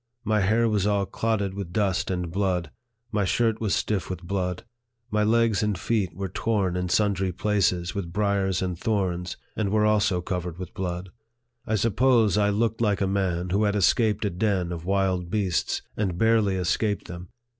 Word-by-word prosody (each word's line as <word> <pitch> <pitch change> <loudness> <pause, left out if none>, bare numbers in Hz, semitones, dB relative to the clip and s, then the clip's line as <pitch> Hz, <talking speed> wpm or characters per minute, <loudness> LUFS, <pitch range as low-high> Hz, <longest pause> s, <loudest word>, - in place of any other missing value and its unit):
My 110 -1 +1
hair 110 +4 +3
was 105 -2 +1
all 100 -1 +1
clotted 105 -2 -1
with 95 -3 -6
dust 95 -2 0
and 90 -3 -2
blood; 90 -4 -1 0.4
my 105 -2 +1
shirt 110 +4 +1
was 110 -3 +1
stiff 105 -4 -1
with 90 -2 -5
blood. 90 -1 -2 0.5
My 105 0 +2
legs 115 -2 +3
and 105 -3 0
feet 105 -6 0
were 95 +1 -3
torn 95 -1 -1
in 90 0 -2
sundry 95 -2 +1
places 90 -3 0
with 90 -4 -4
briers 100 -2 0
and 90 -1 -2
thorns, 90 -3 -1 0.2
and 105 -3 0
were 105 +1 +2
also 105 -3 +2
covered 90 -1 -4
with 90 -2 -7
blood. 90 0 -4 0.6
I 110 - +1
suppose 115 +1 +3
I 105 -1 +3
looked 110 +2 0
like 105 -3 +2
a - - +3
man 95 -2 -1
who 105 +3 +2
had 105 0 +1
escaped 105 +2 +2
a 100 - 0
den 90 -2 0
of 85 -1 -6
wild 95 -2 0
beasts, 95 -3 0
and 95 -5 -1
barely 110 -2 +3
escaped 100 +3 0
them. 90 0 -8
100 Hz, 180 wpm, -25 LUFS, 90-105 Hz, 0.6 s, hair